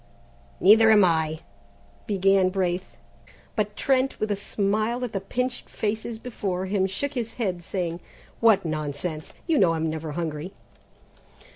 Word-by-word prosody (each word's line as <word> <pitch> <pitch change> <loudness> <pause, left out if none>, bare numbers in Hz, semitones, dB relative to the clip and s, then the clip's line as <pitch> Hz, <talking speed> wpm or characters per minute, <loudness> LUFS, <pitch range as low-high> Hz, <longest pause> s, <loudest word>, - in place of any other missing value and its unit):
"Neither 220 +3 +7
am 210 -3 +7
I," 160 -2 +1 0.7
began 195 -1 +3
Braith, 185 -1 -2 0.6
but 210 -1 -1
Trent, 265 +2 +1
with 215 0 -1
a - - +2
smile 215 +4 -1
at 245 - -4
the 195 - -2
pinched 250 +5 -3
faces 220 +2 -3
before 195 -6 -3
him, 190 0 +1
shook 275 +10 -3
his 235 -4 -3
head 185 -7 -2
saying, 175 -1 -3 0.4
"What 225 -6 +4
nonsense! 155 +1 -4
You 325 -5 +2
know 170 -4 +4
I'm 160 0 -1
never 160 -1 -5
hungry!" 160 +2 -4
195 Hz, 140 wpm, -25 LUFS, 175-220 Hz, 0.7 s, Neither